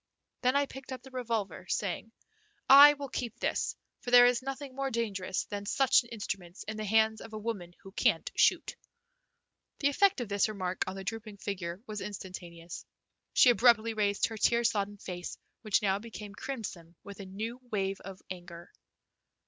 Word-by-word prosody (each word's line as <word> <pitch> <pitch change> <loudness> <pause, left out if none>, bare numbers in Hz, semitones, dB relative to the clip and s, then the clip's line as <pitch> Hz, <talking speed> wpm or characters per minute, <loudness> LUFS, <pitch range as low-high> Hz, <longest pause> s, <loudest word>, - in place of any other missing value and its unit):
Then 255 +1 +2
I 285 0 +3
picked 270 -1 -11
up 260 - -6
the 265 - -13
revolver, 225 -8 -3
saying: 205 +3 -2 0.6
"I 285 +2 +10
will 285 -1 -6
keep 240 -2 -4
this, - - -1 0.2
for - - -6
there 245 0 +9
is 245 0 +3
nothing 270 +1 -6
more 275 +1 -2
dangerous 200 -6 -2
than 205 -1 -6
such 270 +3 +4
an 235 - -15
instrument 195 -5 -6
in 215 - -4
the 215 - -3
hands 220 +1 +3
of 225 - -10
a - - -4
woman 205 -6 -5
who 195 - -11
can't - - +1
shoot." - - +3 1.0
The 285 - +2
effect 385 +4 +3
of 240 - -3
this 200 +1 +1
remark 185 -3 -2
on 185 - -4
the 195 - -6
drooping 215 0 -6
figure 185 -1 -5
was 210 -1 -5
instantaneous. 175 -4 -8 0.5
She 250 - +7
abruptly 230 -2 +4
raised 205 -2 +1
her 225 - -5
tear 235 +3 +3
sodden 205 -3 0
face, 180 -2 -6 0.2
which 215 -2 +1
now 195 -1 +2
became 210 -2 -9
crimson 195 -9 -6
with 200 0 -10
a 200 - -7
new 220 +6 -5
wave 195 -2 -1
of 195 -1 -10
anger. 175 -1 -9
215 Hz, 180 wpm, -30 LUFS, 195-240 Hz, 1.0 s, I